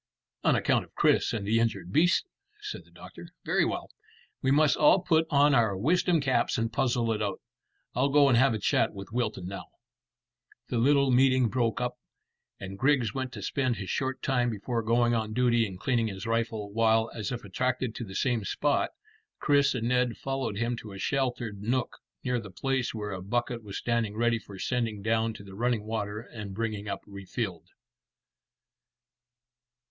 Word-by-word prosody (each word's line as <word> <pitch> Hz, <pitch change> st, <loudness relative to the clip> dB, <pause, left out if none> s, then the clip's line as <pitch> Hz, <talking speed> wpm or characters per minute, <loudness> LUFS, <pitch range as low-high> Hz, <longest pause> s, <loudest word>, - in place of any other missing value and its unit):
"On -, -, +4 dB
account -, -, +2 dB
of -, -, -20 dB
Chris -, -, +3 dB
and 105 Hz, -3 st, -3 dB
the 110 Hz, +3 st, +2 dB
injured 100 Hz, -6 st, -1 dB
beasts," 175 Hz, -, +4 dB, 0.3 s
said 420 Hz, 0 st, -7 dB
the -, -, -23 dB
doctor. -, -, -12 dB, 0.2 s
"Very -, -, +2 dB
well; -, -, -4 dB, 0.5 s
we 130 Hz, -, +1 dB
must 145 Hz, 0 st, +4 dB
all 155 Hz, +5 st, +5 dB
put 160 Hz, -2 st, +2 dB
on 145 Hz, -1 st, +4 dB
our 110 Hz, -6 st, +3 dB
wisdom 170 Hz, -, +2 dB
caps 135 Hz, -2 st, +1 dB
and 115 Hz, 0 st, -1 dB
puzzle 120 Hz, -2 st, +1 dB
it 110 Hz, -, -1 dB
out. -, -, -2 dB, 0.5 s
I'll 130 Hz, +3 st, +2 dB
go 145 Hz, 0 st, +5 dB
and 130 Hz, -, +4 dB
have 120 Hz, -1 st, +4 dB
a -, -, 0 dB
chat 105 Hz, -, +1 dB
with 100 Hz, +1 st, -8 dB
Wilton 110 Hz, -6 st, -2 dB
now." 95 Hz, +2 st, -6 dB, 1.0 s
The 120 Hz, -, 0 dB
little 140 Hz, +2 st, +4 dB
meeting 130 Hz, -1 st, +4 dB
broke 115 Hz, -2 st, 0 dB
up, 125 Hz, 0 st, -3 dB, 0.6 s
and 95 Hz, 0 st, -7 dB
Griggs 130 Hz, -4 st, +2 dB
went 130 Hz, -2 st, -3 dB
to 100 Hz, -, -7 dB
spend 130 Hz, +2 st, 0 dB
his 95 Hz, -2 st, -5 dB
short 130 Hz, -2 st, -2 dB
time 125 Hz, -3 st, +1 dB
before 115 Hz, +2 st, -2 dB
going 120 Hz, +2 st, +2 dB
on 110 Hz, -2 st, -1 dB
duty 120 Hz, -1 st, +3 dB
in 95 Hz, -2 st, -8 dB
cleaning 115 Hz, +2 st, +1 dB
his 100 Hz, 0 st, -6 dB
rifle, 115 Hz, -2 st, -1 dB
while, 110 Hz, 0 st, +3 dB
as 110 Hz, -3 st, -4 dB
if 125 Hz, -, -4 dB
attracted 125 Hz, +4 st, -1 dB
to 120 Hz, -, -5 dB
the 95 Hz, -3 st, -9 dB
same 120 Hz, -1 st, +1 dB
spot, 145 Hz, +8 st, 0 dB, 0.5 s
Chris 140 Hz, -2 st, +3 dB
and 115 Hz, -2 st, -1 dB
Ned 125 Hz, -1 st, +1 dB
followed 135 Hz, -6 st, -3 dB
him 115 Hz, +2 st, 0 dB
to 105 Hz, -3 st, -9 dB
a -, -, -8 dB
sheltered 120 Hz, -4 st, -2 dB
nook 125 Hz, +4 st, -1 dB, 0.2 s
near 125 Hz, -1 st, 0 dB
the 105 Hz, -3 st, -9 dB
place 130 Hz, +8 st, -1 dB
where 105 Hz, -2 st, -5 dB
a 95 Hz, -2 st, -5 dB
bucket 120 Hz, +4 st, -2 dB
was 100 Hz, -2 st, -7 dB
standing 115 Hz, -3 st, -1 dB
ready 120 Hz, 0 st, +2 dB
for 100 Hz, -3 st, -12 dB
sending 115 Hz, -2 st, -2 dB
down 115 Hz, 0 st, +1 dB
to -, -, -10 dB
the 95 Hz, -1 st, -12 dB
running 115 Hz, +1 st, 0 dB
water 105 Hz, -1 st, -3 dB
and 105 Hz, -5 st, -8 dB
bringing 110 Hz, -2 st, -3 dB
up 100 Hz, -, -3 dB
refilled. 100 Hz, -2 st, -5 dB
115 Hz, 185 wpm, -28 LUFS, 105-130 Hz, 1.0 s, all